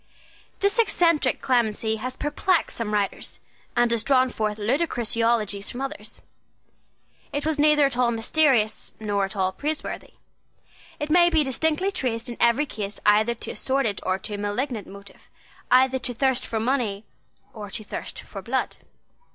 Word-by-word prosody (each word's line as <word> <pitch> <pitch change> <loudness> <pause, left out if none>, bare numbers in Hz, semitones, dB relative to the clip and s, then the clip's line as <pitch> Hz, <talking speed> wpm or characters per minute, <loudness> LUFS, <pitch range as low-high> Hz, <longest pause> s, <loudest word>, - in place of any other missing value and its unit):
This 400 +2 +2
eccentric 335 - +3
clemency 220 -3 +1
has 255 +3 -5
perplexed 320 +4 0
some 230 -3 -3
writers, 205 -2 -2 0.4
and 240 -1 +3
has 230 -2 +1
drawn 260 -1 +3
forth 215 -2 -2
ludicrous 240 +1 0
eulogies 220 -3 +1
from 245 - -6
others. 245 -6 -6 1.1
It 285 +1 -3
was 315 -1 0
neither 300 -1 +5
at 275 - 0
all 245 -1 +4
mysterious 235 -1 +1
nor 205 -2 0
at 195 - -8
all 190 -1 +1
praiseworthy. 300 +8 -4 0.8
It 295 0 -3
may 345 +1 +6
be 320 -3 +3
distinctly 320 +7 0
traced 240 -9 -2
in 235 - -6
every 235 +5 +4
case 205 -7 -6
either 215 +3 +4
to - - -4
a - - -9
sordid 260 -7 0
or 185 - 0
to 210 +2 -6
a - - -3
malignant 210 +2 -2
motive, 200 +1 -14 0.4
either 260 +1 +4
to 245 -1 -2
thirst 265 +1 +1
for 225 - -2
money 225 -4 -1 0.5
or 210 -2 -8
to 215 +2 -5
thirst - - -6
for - - -9
blood. - - -2
240 Hz, 160 wpm, -24 LUFS, 215-285 Hz, 1.1 s, may